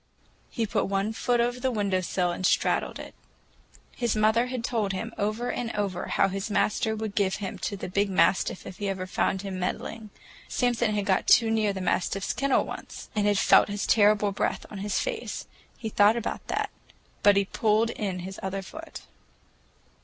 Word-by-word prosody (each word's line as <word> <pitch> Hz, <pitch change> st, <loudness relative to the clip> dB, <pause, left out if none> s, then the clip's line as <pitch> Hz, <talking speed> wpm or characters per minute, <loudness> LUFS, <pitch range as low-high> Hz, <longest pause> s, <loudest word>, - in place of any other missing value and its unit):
He 230 Hz, -, -1 dB
put 205 Hz, -, 0 dB
one 195 Hz, +2 st, 0 dB
foot 240 Hz, +2 st, +1 dB
over 240 Hz, +1 st, +1 dB
the 260 Hz, +1 st, 0 dB
window 200 Hz, -5 st, 0 dB
sill 180 Hz, 0 st, 0 dB
and 180 Hz, -, -5 dB
straddled -, -, +1 dB
it. -, -, -9 dB, 0.8 s
His 240 Hz, -3 st, 0 dB
mother 220 Hz, +3 st, +3 dB
had 250 Hz, -2 st, -4 dB
told 215 Hz, -5 st, 0 dB
him 225 Hz, +5 st, -4 dB
over 215 Hz, +4 st, -1 dB
and 240 Hz, -2 st, -3 dB
over 195 Hz, -3 st, -2 dB
how -, -, +3 dB
his 195 Hz, +2 st, -4 dB
master 215 Hz, +2 st, +1 dB
would 220 Hz, -1 st, -4 dB
give 195 Hz, -2 st, +1 dB
him 195 Hz, -2 st, -5 dB
to 200 Hz, -, -3 dB
the -, -, -5 dB
big 200 Hz, +2 st, 0 dB
mastiff 190 Hz, 0 st, +2 dB
if 185 Hz, -, -8 dB
he 205 Hz, -1 st, -1 dB
ever 190 Hz, -1 st, -3 dB
found 190 Hz, +1 st, -1 dB
him 190 Hz, -2 st, -4 dB
"meddling." 215 Hz, +4 st, -4 dB, 0.4 s
Samson 240 Hz, -3 st, +1 dB
had 205 Hz, -1 st, -1 dB
got 190 Hz, -2 st, +1 dB
too 225 Hz, -2 st, +6 dB
near 215 Hz, -2 st, +2 dB
the 190 Hz, -1 st, -5 dB
mastiff's 185 Hz, +2 st, 0 dB
kennel 275 Hz, 0 st, +2 dB
once, -, -, -8 dB
and 210 Hz, -1 st, +2 dB
had 205 Hz, -1 st, +3 dB
felt -, -, +5 dB
his 205 Hz, 0 st, -2 dB
terrible 210 Hz, -1 st, +4 dB
breath 195 Hz, -, -2 dB
in 205 Hz, -, -6 dB
his 205 Hz, +1 st, -1 dB
face. 475 Hz, -2 st, -4 dB, 0.3 s
He 220 Hz, -, -4 dB
thought 210 Hz, +2 st, +4 dB
about 235 Hz, -, -4 dB
that, -, -, -1 dB, 0.5 s
but 205 Hz, -1 st, +6 dB
he 200 Hz, -, +3 dB
pulled 220 Hz, +3 st, +1 dB
in 190 Hz, -5 st, -3 dB
his 190 Hz, +2 st, -7 dB
other 195 Hz, 0 st, -3 dB
foot. 320 Hz, -, -9 dB
205 Hz, 190 wpm, -27 LUFS, 195-225 Hz, 0.8 s, too